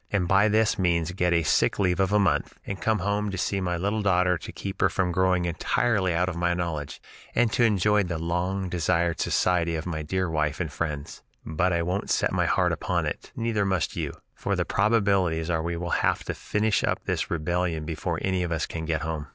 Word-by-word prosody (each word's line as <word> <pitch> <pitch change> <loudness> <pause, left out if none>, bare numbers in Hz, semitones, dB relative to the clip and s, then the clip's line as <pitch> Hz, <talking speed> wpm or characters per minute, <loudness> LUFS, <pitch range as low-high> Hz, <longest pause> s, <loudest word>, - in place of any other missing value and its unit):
and 95 -4 +1
by 100 +3 +4
this 110 0 +2
means 85 -2 +1
get 90 -1 0
a 85 -1 +3
sick - - +2
leave 90 -2 +1
of 95 0 +2
a 105 - +4
month, 100 -4 +1
and 100 -1 -5
come 110 -1 +2
home 100 +2 -1
to 95 - -4
see 95 +2 -1
my 90 -1 -1
little 100 +5 -1
daughter 90 -2 +3
to 80 - -7
keep 95 0 -6
her - - +5
from 90 -2 0
growing 90 0 +2
entirely 95 +3 +1
out 85 +2 +1
of 95 - -3
my 85 0 +1
knowledge, 80 -5 -4 0.4
and 120 -2 +3
to 120 - +3
enjoy 105 -1 +3
the 90 -4 -2
long 90 +4 -1
desired 85 -1 0
society 85 -2 +1
of 80 - -4
my 80 -3 -3
dear 95 +4 -1
wife 75 -2 -1
and 85 -5 -2
friends. 75 -3 -4 0.2
But 85 +4 0
I 85 -1 +1
won't 90 +4 -2
set - - +1
my - - +1
heart - - +2
upon - - -1
it, - - -5
neither 115 -3 0
must 95 -3 0
you, - - -3 0.2
for - - -2
the - - 0
probabilities 100 -6 +2
are 80 -1 +1
we 85 +1 -3
will 85 0 -4
have - - +1
to - - -3
finish 105 0 0
up - - -1
this - - -2
rebellion 85 -1 -1
before 80 +1 -3
any 95 -1 0
of 90 -1 -2
us 80 -1 0
can 80 -1 -5
get 80 -2 -1
home. 80 -2 -4
90 Hz, 225 wpm, -26 LUFS, 85-100 Hz, 0.4 s, her